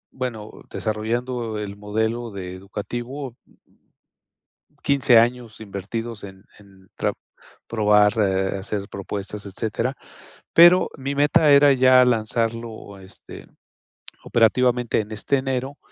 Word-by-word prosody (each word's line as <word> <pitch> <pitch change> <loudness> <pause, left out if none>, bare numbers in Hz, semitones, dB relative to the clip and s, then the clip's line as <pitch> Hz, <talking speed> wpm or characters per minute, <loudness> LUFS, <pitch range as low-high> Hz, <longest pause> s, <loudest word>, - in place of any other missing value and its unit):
bueno, 115 -5 -5 0.2
desarrollando 115 +1 -3
el 100 -1 -5
modelo 110 +3 -2
de 95 -3 -7
educativo, 120 +7 -6 1.5
15 140 -4 +4
años, 120 -1 0
invertidos 110 +2 -6
en 95 0 -12
en 95 -2 -20
trap - - -1 0.5
probar, 105 -2 +3
eh, 95 -2 +1
hacer 100 +1 -4
propuestas, 100 +1 -6
etcétera. 115 +6 -3 0.6
Pero, 175 +2 +7
mi 135 +1 -3
meta 145 +1 +3
era 140 0 +7
ya 130 -1 +6
lanzarlo, 115 -2 -2
este, 95 +1 -13 0.8
operativamente, 120 +1 +2
en 105 0 -7
este 110 +6 0
enero. 135 +1 -3
115 Hz, 105 wpm, -22 LUFS, 105-125 Hz, 1.5 s, Pero